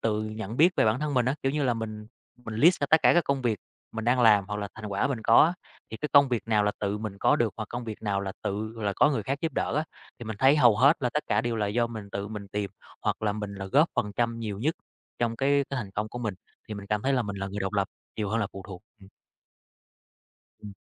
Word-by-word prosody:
tự 110 -1 0
nhận 110 0 -6
biết 170 +6 +5
về - - +4
bản 110 +4 +2
thân 150 -1 -2
mình 125 -2 +2
á, 130 - +2
kiểu 135 - +1
như 150 -1 0
là, 125 -2 +2
mình 110 -1 -6 0.4
mình 110 - -6
list 165 +11 +4
ra 145 - +1
tất 160 - +5
cả - - +6
các 175 - +4
công 140 -1 -1
việc 115 -4 0 0.4
mình 110 0 -3
đang 125 +2 +3
làm 105 -4 +6
hoặc 105 - -3
là 105 -1 -4
thành 110 -1 -8
quả 100 +3 0
mình 135 -4 -2
có 115 +1 +5
á, 165 - +2 0.4
thì 110 - -5
cái 150 - -4
công 140 -1 +7
việc 120 -4 -1
nào 105 -2 +3
là 105 - +1
tự 100 0 -1
mình 105 -2 -6
có - - +3
được 115 -3 0
hoặc 110 -2 -5
công 120 0 -5
việc 110 -2 -7
nào 100 -2 0
là 100 -1 -4
tự 110 +3 -3
là 105 -3 -1
có 150 - +5
người 135 - -1
khác 135 +1 -2
giúp 165 - -2
đỡ - - -1
á. 155 - +1 0.3
Thì 120 - -8
mình 110 -1 -5
thấy 135 +3 +5
hầu 120 -7 +5
hết 140 +8 +5
là 125 - +1
tất 150 - 0
cả 105 - +2
đều 115 0 -2
là 105 -2 0
do 115 +3 +1
mình 110 -3 -8
tự 100 +1 -4
mình 105 -2 -7
tìm 100 -1 -2 0.3
hoặc - - -1
là 105 -1 +1
mình 105 -1 -5
là 100 0 -6
góp 145 - +4
phần 105 0 -1
trăm 115 -1 0
nhiều 105 -4 -4
nhất 150 +9 0 0.4
trong 115 -1 0
cái 140 +2 +2
cái 140 - -2
thành 105 -5 -5
công 105 +2 -3
của 120 - -7
mình, 110 -5 -3 0.3
thì 105 - -5
mình 100 0 -8
cảm 105 0 -1
thấy 135 - +1
là 125 - +2
mình 100 -2 -5
là 100 - -3
người 100 +1 -5
độc 95 0 -2
lập 100 -2 0 0.3
nhiều 105 -2 -2
hơn 110 +3 0
là 105 - 0
phụ 95 - -8
thuộc. 95 -2 -9 0.2
Ừm. 95 - -15 1.6
Ừm. 105 -1 -8
110 Hz, 290 wpm, -27 LUFS, 105-125 Hz, 1.6 s, công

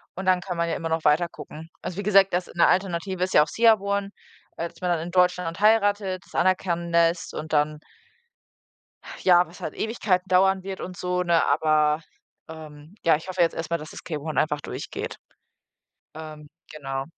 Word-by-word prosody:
und 190 +1 -6
dann 185 -1 +3
kann 180 -2 -5
man 170 0 0
ja - - -1
immer 165 -1 -4
noch 160 0 -2
weiter 160 +3 +3
gucken. 155 +2 -11
Also, 180 - -6
wie 200 - -3
gesagt, 195 -2 +4
dass 180 0 0
'ne 170 - +4
Alternative 185 0 0
ist 185 - -2
ja 150 - +7
auch - - -7
CR-1, 200 -1 +2 0.5
äh, 170 - -2
dass - - -19
man 180 - -1
dann 170 - +1
in 170 +2 -6
Deutschland 180 -2 +1
heiratet, 205 -3 +2
das - - -17
anerkennen 175 -2 0
lässt 170 0 +2
und 155 +1 -6
dann 150 0 +1 1.3
ah, - - -9
ja, 175 -1 +6
was 170 - -15
halt - - -5
Ewigkeiten 200 -4 -1
dauern 190 +1 +3
wird 190 0 -6
und 180 -1 -7
so, 180 0 -1
ne? 170 -2 +2
Aber, 155 0 +2 0.5
ähm 155 +1 -11
ja, 165 -2 +5
ich 160 - -11
hoffe 185 -1 0
jetzt 165 - +2
erst 165 0 -5
mal, 170 - +2
dass 155 - -10
das - - -10
K-1 155 -2 -4
einfach 150 -1 +1
durchgeht, - - -6 1.0
ähm, 155 -1 -10 0.2
genau. 135 -2 -4
175 Hz, 195 wpm, -24 LUFS, 160-185 Hz, 1.3 s, ja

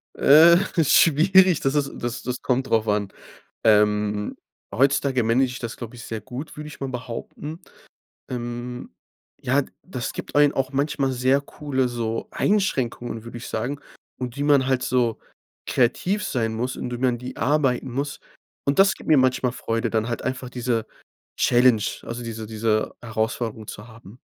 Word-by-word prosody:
Äh, 165 +4 +7 0.3
schwierig, 170 +4 +5
das 135 +1 0
ist 140 -2 +1
das 120 0 -4
das 125 0 -4
kommt 130 +1 0
drauf 110 -1 +2
an. 105 -1 0 0.6
Ähm, 105 -1 +2 0.4
heutzutage 135 +1 +2
manage 115 +4 +3
ich 125 0 -6
das, 115 -1 -6
glaube 120 0 -8
ich, 120 - -10
sehr 110 -1 -5
gut, 130 +9 -8
würde 150 0 -7
ich 150 - -12
mal 135 - -3
behaupten. 125 +6 -7 0.7
Ähm, 120 0 -5 0.5
ja, 140 +3 +2 0.2
das 125 -10 -5
gibt - - -8
einen 145 0 +5
auch 135 0 -2
manchmal 140 -1 0
sehr 130 +2 +2
coole, 140 -2 -2
so 115 -2 -3
Einschränkungen, 125 - -1
würde 115 0 -9
ich 120 - -8
sagen 125 +6 -3 0.4
und 125 -2 -4
die 145 - -2
man 145 -3 +4
halt 130 -1 +1
so 120 -3 +1 0.5
kreativ 180 - +1
sein 115 -3 -1
muss 125 +3 -2
und 125 - -5
wie 120 - -3
man 125 -2 +1
die 125 +1 -8
arbeiten 135 -3 +1
muss. 140 +3 -3 0.5
Und 140 0 0
das 195 0 +5
gibt - - -13
mir 155 - +6
manchmal 130 -1 +2
Freude, 115 -2 -2
dann 110 0 0
halt 120 - -3
einfach 130 -1 -4
diese 120 -3 -1 0.5
Challenge, 120 -3 +4 0.2
also, 120 +1 -6
diese 115 -1 -6
diese 110 0 -1
Herausforderung 110 -1 -3
zu 105 +3 -8
haben. 115 0 -14
125 Hz, 165 wpm, -23 LUFS, 115-140 Hz, 0.7 s, Äh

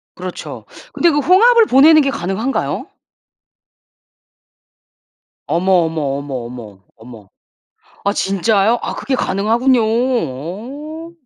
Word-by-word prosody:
그렇죠. 180 0 -8 0.3
근데 340 - +2
그 295 - 0
홍합을 440 - +5
보내는 310 +2 +6
게 275 - 0
가능한가요? 205 +7 -3 2.6
어머, 185 +3 0
어머, 160 -1 -3 0.2
어머, 140 -1 -7
어머. 115 -5 -10 0.2
어머. 110 -3 -14 0.7
아 200 - +1
진짜요? 200 +3 +1
아 - - -4
그게 265 - -2
가능하군요. 230 +6 +1
어. 245 - -3
220 Hz, 220 characters per minute, -17 LUFS, 170-275 Hz, 2.6 s, 보내는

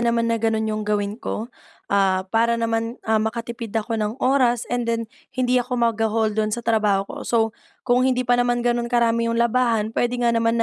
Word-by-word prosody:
naman 235 -1 +1
na 230 - -1
gano'n 220 -1 +1
'yong 215 0 -2
gawin 205 -1 0
ko, 230 +4 -5 0.4
ah, 190 -1 +2
para 230 +1 +3
naman, 230 +1 -1
ah, 220 -1 +2
makatipid 230 +1 -4
ako 225 0 -1
ng 215 +2 -2
oras, 255 -3 +2
and 245 -1 -1
then 230 0 0 0.2
hindi 250 0 +1
ako 250 +1 -3
magahol 225 -2 +1
do'n 215 0 0
sa 235 +2 -4
trabaho 210 -3 +2
ko. - - -10
So 235 - +2 0.5
kung 245 0 +3
hindi 255 -1 +1
pa 245 0 +3
naman 245 0 0
gano'n 240 0 0
karami 235 -1 +2
'yong 230 - -1
labahan, 235 -2 +1
puwede 245 +2 0
nga 235 - +3
naman 230 0 +1
230 Hz, 200 wpm, -22 LUFS, 220-240 Hz, 0.5 s, para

